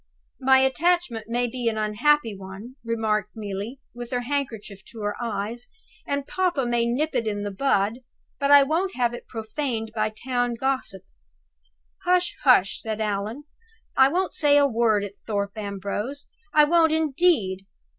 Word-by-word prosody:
My 265 Hz, 0 st, +5 dB
attachment 265 Hz, -4 st, +1 dB
may 245 Hz, +1 st, +1 dB
be 240 Hz, 0 st, -3 dB
an 220 Hz, -, -4 dB
unhappy 220 Hz, +3 st, +2 dB
one," 195 Hz, +6 st, -10 dB
remarked 215 Hz, -2 st, -1 dB
Neelie, 210 Hz, +4 st, -5 dB
with 240 Hz, 0 st, -7 dB
her 245 Hz, -1 st, -1 dB
handkerchief 240 Hz, -7 st, -4 dB
to 225 Hz, -, -10 dB
her 205 Hz, 0 st, -2 dB
eyes, 230 Hz, +1 st, -4 dB, 0.4 s
"and 280 Hz, -1 st, -1 dB
papa 355 Hz, -8 st, 0 dB
may 240 Hz, -1 st, +1 dB
nip 290 Hz, +7 st, 0 dB
it 235 Hz, -3 st, 0 dB
in 205 Hz, -1 st, -2 dB
the 205 Hz, -, -3 dB
bud, 215 Hz, 0 st, +1 dB, 0.4 s
but 280 Hz, -1 st, +1 dB
I 285 Hz, -1 st, +9 dB
won't 340 Hz, +7 st, -1 dB
have 240 Hz, -1 st, +1 dB
it 240 Hz, -, -8 dB
profaned 225 Hz, 0 st, -4 dB
by 215 Hz, -1 st, 0 dB
the 215 Hz, -, -20 dB
town 245 Hz, -2 st, 0 dB
gossip!" 235 Hz, -6 st, -2 dB, 1.0 s
"Hush! 360 Hz, 0 st, +2 dB
hush!" 220 Hz, -8 st, +4 dB
said 220 Hz, -1 st, -4 dB
Allan. 215 Hz, +5 st, -2 dB, 0.5 s
"I 265 Hz, -, +7 dB
won't 360 Hz, +6 st, -1 dB
say 290 Hz, -1 st, +5 dB
a 285 Hz, -, +5 dB
word 225 Hz, -5 st, +2 dB
at 200 Hz, -1 st, -6 dB
Thorpe 200 Hz, -1 st, -2 dB
Ambrose, 205 Hz, +6 st, -4 dB, 0.2 s
I 300 Hz, -, +6 dB
won't 325 Hz, +1 st, +4 dB
indeed!" 285 Hz, -, +1 dB
240 Hz, 160 wpm, -25 LUFS, 210-280 Hz, 1.0 s, I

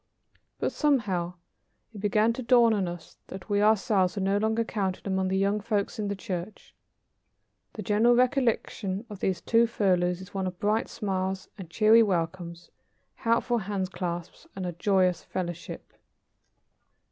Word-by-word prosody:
But, -, -, -1 dB
somehow, 200 Hz, -, 0 dB, 0.6 s
it 210 Hz, -, -9 dB
began 215 Hz, +2 st, +2 dB
to 255 Hz, -, -5 dB
dawn 235 Hz, -2 st, +5 dB
on 195 Hz, -4 st, 0 dB
us 175 Hz, -1 st, -8 dB
that 190 Hz, +3 st, -9 dB
we 205 Hz, 0 st, +3 dB
ourselves 205 Hz, -3 st, +3 dB
were 200 Hz, -, -2 dB
no 195 Hz, +1 st, +2 dB
longer 220 Hz, +2 st, +1 dB
counted 195 Hz, -5 st, -3 dB
among 190 Hz, -1 st, 0 dB
the 190 Hz, +1 st, 0 dB
young 200 Hz, +2 st, +1 dB
folks 210 Hz, 0 st, -2 dB
in 210 Hz, -, -1 dB
the 200 Hz, -, -2 dB
church. 190 Hz, 0 st, -6 dB, 1.0 s
The 215 Hz, -, -6 dB
general 220 Hz, +5 st, +4 dB
recollection 240 Hz, -5 st, 0 dB
of 205 Hz, -, -8 dB
those 190 Hz, -2 st, -1 dB
two 230 Hz, 0 st, +3 dB
furloughs 180 Hz, -5 st, +1 dB
is 190 Hz, +1 st, -12 dB
one 190 Hz, -1 st, -2 dB
of 180 Hz, -1 st, -6 dB
bright 215 Hz, +2 st, 0 dB
smiles 190 Hz, -2 st, -3 dB
and 185 Hz, -4 st, -9 dB
cheery 220 Hz, +5 st, +5 dB
welcomes, 170 Hz, -3 st, -2 dB, 0.4 s
helpful 235 Hz, +1 st, +1 dB
handclasps 185 Hz, -4 st, -4 dB
and 190 Hz, -1 st, -4 dB
a 175 Hz, -, -2 dB
joyous 180 Hz, 0 st, +1 dB
fellowship. 175 Hz, -2 st, -6 dB
195 Hz, 150 wpm, -27 LUFS, 185-220 Hz, 1.0 s, dawn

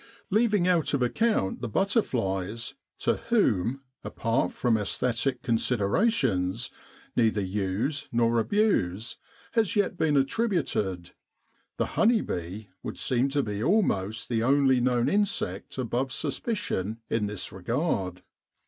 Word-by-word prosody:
Leaving 210 Hz, -3 st, +3 dB
out 170 Hz, -5 st, +2 dB
of 130 Hz, -, +1 dB
account 210 Hz, -, +1 dB
the 120 Hz, -, -3 dB
butterflies 115 Hz, -, 0 dB, 0.2 s
to -, -, +1 dB
whom, 135 Hz, -, +2 dB, 0.2 s
apart 115 Hz, -6 st, 0 dB
from 120 Hz, -3 st, +1 dB
aesthetic 120 Hz, +4 st, -1 dB
considera 120 Hz, -, +2 dB
tions, 95 Hz, -, 0 dB, 0.4 s
neither 110 Hz, -3 st, +3 dB
use 100 Hz, +9 st, -1 dB
nor 115 Hz, 0 st, +2 dB
abuse 115 Hz, -, +1 dB, 0.3 s
has 225 Hz, -4 st, +1 dB
yet 200 Hz, -3 st, +1 dB
been 150 Hz, -4 st, +2 dB
attributed 135 Hz, -, 0 dB, 0.7 s
the -, -, +1 dB
honey 225 Hz, 0 st, +3 dB
bee 90 Hz, +5 st, -5 dB
would -, -, -6 dB
seem 130 Hz, +2 st, +1 dB
to 140 Hz, 0 st, +1 dB
be 105 Hz, -2 st, -3 dB
almost 110 Hz, -, +1 dB
the 115 Hz, -2 st, 0 dB
only 135 Hz, 0 st, +4 dB
known 120 Hz, -1 st, +2 dB
insect 210 Hz, -2 st, -1 dB
above 130 Hz, +1 st, -1 dB
suspicion 115 Hz, -, -2 dB
in 110 Hz, -2 st, 0 dB
this 105 Hz, -2 st, -4 dB
regard. 95 Hz, -, -2 dB
120 Hz, 120 wpm, -27 LUFS, -, 0.7 s, only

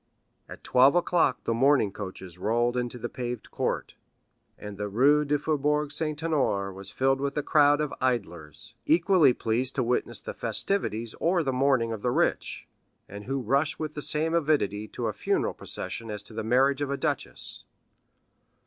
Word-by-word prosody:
At -, -, -11 dB
eleven 135 Hz, +6 st, +6 dB
o'clock 175 Hz, -6 st, +1 dB
the 115 Hz, -, 0 dB
mourning 130 Hz, -3 st, +3 dB
coaches 95 Hz, -3 st, -8 dB
rolled 120 Hz, +4 st, +1 dB
into 125 Hz, 0 st, -2 dB
the 120 Hz, 0 st, -4 dB
paved 120 Hz, -2 st, -6 dB
court, -, -, -2 dB, 0.6 s
and 105 Hz, -1 st, -8 dB
the 105 Hz, +1 st, -4 dB
Rue 140 Hz, +8 st, +4 dB
du 150 Hz, 0 st, +1 dB
Faubourg 150 Hz, 0 st, 0 dB
Saint 155 Hz, -1 st, -3 dB
Honoré 130 Hz, -12 st, 0 dB
was 95 Hz, +1 st, -7 dB
filled 135 Hz, 0 st, +1 dB
with 140 Hz, +1 st, -2 dB
a 150 Hz, -, 0 dB
crowd 145 Hz, -1 st, +4 dB
of 150 Hz, -1 st, -2 dB
idlers, 100 Hz, -, -3 dB
equally 170 Hz, -3 st, +5 dB
pleased 120 Hz, +2 st, -1 dB
to 130 Hz, -, +1 dB
witness 120 Hz, +1 st, -1 dB
the -, -, -7 dB
festivities 115 Hz, -, -1 dB
or 175 Hz, 0 st, +2 dB
the 135 Hz, -3 st, -1 dB
mourning 130 Hz, -3 st, +2 dB
of 110 Hz, -, -6 dB
the 125 Hz, -, 0 dB
rich, -, -, -1 dB, 0.4 s
and 100 Hz, +1 st, -9 dB
who 135 Hz, +1 st, -2 dB
rush 140 Hz, +7 st, +1 dB
with 155 Hz, -1 st, -4 dB
the 150 Hz, -, -5 dB
same 155 Hz, +3 st, 0 dB
avidity 140 Hz, -, +1 dB
to 120 Hz, -, -5 dB
a 110 Hz, -, -1 dB
funeral -, -, 0 dB
procession 115 Hz, -1 st, -5 dB
as 105 Hz, -1 st, -5 dB
to 110 Hz, -, -15 dB
the 110 Hz, 0 st, -4 dB
marriage 130 Hz, +5 st, +2 dB
of 145 Hz, -, -1 dB
a 140 Hz, -, -1 dB
duchess. -, -, -4 dB
130 Hz, 175 wpm, -27 LUFS, 110-150 Hz, 0.6 s, eleven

